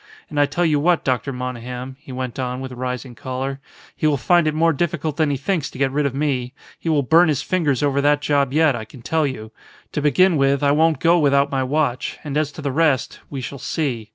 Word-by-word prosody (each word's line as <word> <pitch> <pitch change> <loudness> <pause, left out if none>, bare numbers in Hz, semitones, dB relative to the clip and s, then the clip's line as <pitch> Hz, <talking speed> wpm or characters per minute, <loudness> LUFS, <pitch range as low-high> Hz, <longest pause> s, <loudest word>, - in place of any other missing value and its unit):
And 150 - -1
I 145 - +4
tell 175 +5 0
you 150 -3 +2
what, 175 +3 +2
Dr. 130 +1 -1
Monygham," 125 0 -6
he 140 -2 -12
went 130 -1 -5
on 125 0 -2
with 130 0 -6
rising 125 0 -5
choler, 130 +3 -4 0.4
"he 155 - 0
will 145 -2 +2
find 170 +6 +3
it 155 - 0
more 165 +1 +3
difficult 155 -1 -2
than 155 -2 +1
he 140 - 0
thinks 160 +2 -1
to - - -12
get 135 0 +1
rid 145 +1 +1
of 135 - -5
me. 135 -4 -1 0.3
He 165 - -3
will 150 -3 +2
burn 165 +6 +5
his 150 -2 0
fingers 150 -8 0
over 140 -1 +2
that 145 0 +3
job 140 -2 +1
yet, 155 -2 +3
I 115 - -5
can 115 +2 -14
tell 160 +1 +1
you. 110 -5 -6 0.4
To 150 - -2
begin 160 +5 +4
with, 140 0 +2
I 140 - +4
won't 160 +1 +3
go 170 +1 +4
without 140 -1 +3
my 135 -1 0
watch, 130 -1 -1
and 145 -2 -5
as 150 -1 0
to 155 - -9
the 140 - -1
rest 145 -2 +1
we 135 -2 -5
shall 140 +2 -6
see. 130 -6 -3
140 Hz, 240 wpm, -21 LUFS, 130-155 Hz, 0.4 s, burn